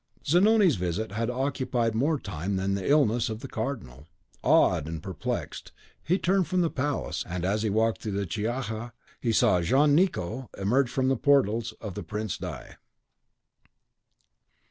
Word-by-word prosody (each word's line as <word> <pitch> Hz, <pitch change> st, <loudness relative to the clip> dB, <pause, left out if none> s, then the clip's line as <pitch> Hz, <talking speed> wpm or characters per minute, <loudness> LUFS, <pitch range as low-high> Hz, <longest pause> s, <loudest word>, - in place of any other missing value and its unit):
Zanoni's 190 Hz, -, +4 dB
visit 90 Hz, +5 st, -2 dB
had 115 Hz, +3 st, -2 dB
occupied 125 Hz, -3 st, -1 dB
more 145 Hz, +8 st, +1 dB
time 95 Hz, -, -4 dB
than 95 Hz, +1 st, 0 dB
the 100 Hz, +3 st, -2 dB
illness 120 Hz, -6 st, +3 dB
of 110 Hz, +1 st, -5 dB
the -, -, -6 dB
Cardinal. 75 Hz, -, -5 dB, 0.3 s
Awed 85 Hz, -5 st, +3 dB
and 80 Hz, -1 st, -6 dB
perplexed, -, -, -5 dB, 0.3 s
he 180 Hz, +3 st, +2 dB
turned 190 Hz, -2 st, +1 dB
from 180 Hz, +3 st, +1 dB
the 165 Hz, -, +1 dB
palace, 145 Hz, +2 st, -2 dB
and 90 Hz, 0 st, -3 dB
as 105 Hz, +3 st, 0 dB
he 110 Hz, -, 0 dB
walked 110 Hz, +2 st, +1 dB
through 105 Hz, -, -4 dB
the 100 Hz, 0 st, -1 dB
Chiaja, 115 Hz, +3 st, -3 dB, 0.3 s
he 115 Hz, -, 0 dB
saw 90 Hz, -5 st, +3 dB
Jean 140 Hz, -, +3 dB
Nicot 130 Hz, -, 0 dB
emerge 120 Hz, +7 st, +2 dB
from 130 Hz, +1 st, 0 dB
the 135 Hz, -, +3 dB
portals 115 Hz, -5 st, +2 dB
of 105 Hz, -4 st, -6 dB
the 105 Hz, -, -5 dB
Prince 105 Hz, +2 st, -4 dB
di -, -, -6 dB
115 Hz, 160 wpm, -27 LUFS, 100-140 Hz, 0.3 s, Zanoni's